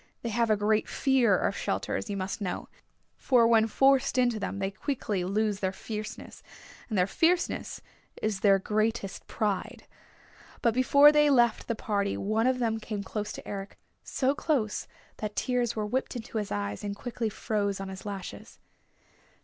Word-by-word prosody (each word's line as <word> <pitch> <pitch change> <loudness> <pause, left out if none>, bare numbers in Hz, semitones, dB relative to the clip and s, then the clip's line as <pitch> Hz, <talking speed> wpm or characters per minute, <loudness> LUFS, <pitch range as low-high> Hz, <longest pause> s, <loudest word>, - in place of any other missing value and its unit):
They 235 - -2
have 230 +1 +1
a 215 - +4
great 210 +1 +1
fear 265 -3 +3
of - - 0
shelters, - - -2
you 200 - -2
must 195 +3 -4
know, 185 -3 -3 0.5
for 245 -3 +4
when 225 -1 +4
forced 270 +3 +3
into 245 -3 +2
them 195 - -3
they 195 0 -2
quickly 210 -4 -2
lose 205 +2 0
their 190 -2 0
fierceness, 215 +3 -7 0.5
and 215 - -1
their 180 - +4
fierceness 340 - 0 0.4
is 215 -3 -1
their 195 -1 +5
greatest 215 0 -1
pride. 210 -4 -2 0.8
But 235 - +3
before 280 +4 +7
they 295 0 +4
left 240 -5 +3
the 230 - -1
party 200 -2 -1
one 220 +4 +1
of 260 0 +2
them 225 -2 0
came 210 -2 -5
close 210 +1 -4
to - - -9
Eric, 200 0 -6 0.3
so 270 0 0
close 275 -8 -1 0.3
that 210 -1 -5
tears 245 -2 0
were 215 -1 -1
whipped 255 +5 -2
into 225 -1 -4
his 210 - -4
eyes 100 0 -3
and 200 -1 -3
quickly 235 0 -3
froze 205 -2 -2
on 195 0 -5
his 190 0 -8
lashes. 200 -3 -7
215 Hz, 170 wpm, -28 LUFS, 200-240 Hz, 0.8 s, before